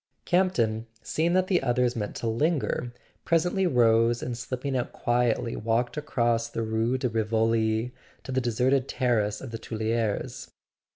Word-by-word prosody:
Campton, 115 Hz, -, +1 dB, 0.2 s
seeing 165 Hz, +2 st, 0 dB
that 185 Hz, 0 st, +3 dB
the 185 Hz, -1 st, +2 dB
others 125 Hz, -1 st, +1 dB
meant 105 Hz, -3 st, -4 dB
to -, -, -5 dB
lin¬ 145 Hz, +9 st, +1 dB
ger, 125 Hz, -1 st, -3 dB, 0.3 s
presently 175 Hz, +3 st, +2 dB
rose 115 Hz, -4 st, +3 dB
and 120 Hz, -, -3 dB
slipping 130 Hz, +3 st, -4 dB
out 125 Hz, -, -1 dB
quietly 120 Hz, -1 st, 0 dB
walked 115 Hz, +2 st, 0 dB
across 120 Hz, -6 st, 0 dB
the 115 Hz, -1 st, -3 dB
Rue 110 Hz, +3 st, 0 dB
de 130 Hz, -, -1 dB
Rivoli 110 Hz, +1 st, +1 dB, 0.3 s
to 130 Hz, -, -7 dB
the 130 Hz, 0 st, +1 dB
deserted 125 Hz, +3 st, +1 dB
terrace 110 Hz, -5 st, 0 dB
of 130 Hz, -, -7 dB
the 115 Hz, -, -5 dB
Tuileries. 110 Hz, -1 st, -2 dB
120 Hz, 155 wpm, -27 LUFS, 115-130 Hz, 0.3 s, that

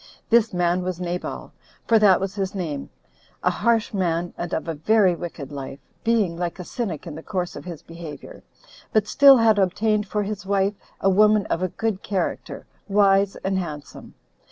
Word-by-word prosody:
This 230 Hz, -1 st, +4 dB
man 180 Hz, 0 st, +1 dB
was 180 Hz, -1 st, -3 dB
Nabal, 180 Hz, 0 st, -4 dB, 0.3 s
for 225 Hz, -1 st, +4 dB
that 200 Hz, -3 st, +5 dB
was 195 Hz, 0 st, -3 dB
his 195 Hz, -1 st, -3 dB
name,a 140 Hz, -, -5 dB
harsh 230 Hz, -2 st, +1 dB
man, 175 Hz, -3 st, -1 dB
and 175 Hz, -, -5 dB
of 160 Hz, -, -2 dB
a 165 Hz, -, -1 dB
very 190 Hz, +4 st, +3 dB
wicked 165 Hz, -5 st, -7 dB
life, 135 Hz, -1 st, -6 dB, 0.3 s
being 220 Hz, -7 st, +2 dB
like 175 Hz, 0 st, -3 dB
a 180 Hz, -, -6 dB
cynic 195 Hz, -, -4 dB
in 165 Hz, -, -7 dB
the 160 Hz, -, -8 dB
course 180 Hz, -2 st, -3 dB
of -, -, -9 dB
his 170 Hz, -4 st, -8 dB
behavior, 165 Hz, -2 st, -10 dB, 0.5 s
but 215 Hz, -2 st, +3 dB
still 275 Hz, +5 st, +7 dB
had 225 Hz, -3 st, +4 dB
obtained 210 Hz, +3 st, +1 dB
for 210 Hz, +1 st, -1 dB
his 205 Hz, 0 st, -5 dB
wife 195 Hz, +1 st, +1 dB, 0.3 s
a 195 Hz, -, +3 dB
woman 210 Hz, +1 st, +4 dB
of 170 Hz, -, 0 dB
a 185 Hz, -, +1 dB
good 220 Hz, 0 st, -2 dB
character, 195 Hz, -3 st, -3 dB, 0.2 s
wise 195 Hz, -1 st, +3 dB
and 190 Hz, 0 st, 0 dB
handsome. 150 Hz, -5 st, -8 dB
190 Hz, 180 wpm, -23 LUFS, 170-210 Hz, 0.5 s, still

